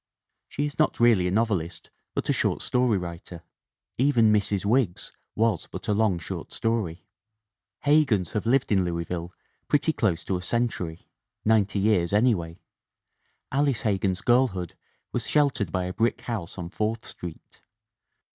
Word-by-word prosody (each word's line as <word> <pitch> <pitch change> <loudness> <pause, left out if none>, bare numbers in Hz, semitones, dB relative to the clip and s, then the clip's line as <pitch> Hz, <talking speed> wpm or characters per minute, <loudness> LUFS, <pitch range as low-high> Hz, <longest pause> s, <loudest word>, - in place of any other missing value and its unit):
She 145 - -2
is 145 +1 -6
not 155 - +2
really 115 -7 +5
a - - -1
novelist 95 -5 -1 0.2
but - - -2
a - - +3
short - - 0
story 125 -4 +2
writer. 85 -1 -7 0.6
Even 120 -5 +4
Mrs. 100 -1 0
Wiggs 110 -4 +1 0.2
was 115 0 +1
but - - -7
a 105 - +2
long 105 -3 +2
short 85 - -7
story. 110 -7 -2 0.8
Hegans 135 - +3
have 105 - -2
lived 130 0 +2
in 95 -3 +4
Louisville 85 0 -3 0.4
pretty 150 +2 +2
close 95 - 0
to 95 - -1
a - - -6
century 95 -7 -2 0.4
ninety 105 -2 +3
years 100 -3 +2
anyway. 100 -7 +1 0.9
Alice 140 -2 +1
Hegan' 100 -3 +1
s 90 - -7
girl 125 +4 +4
hood 90 -6 -6 0.4
was - - -2
sheltered 140 - +1
by 90 +2 -1
a 90 0 -4
brick 115 +4 0
house 105 -9 -5
on 85 -2 -5
Fourth 110 +2 -2
Street. 85 -3 -9
105 Hz, 155 wpm, -26 LUFS, 90-120 Hz, 0.9 s, really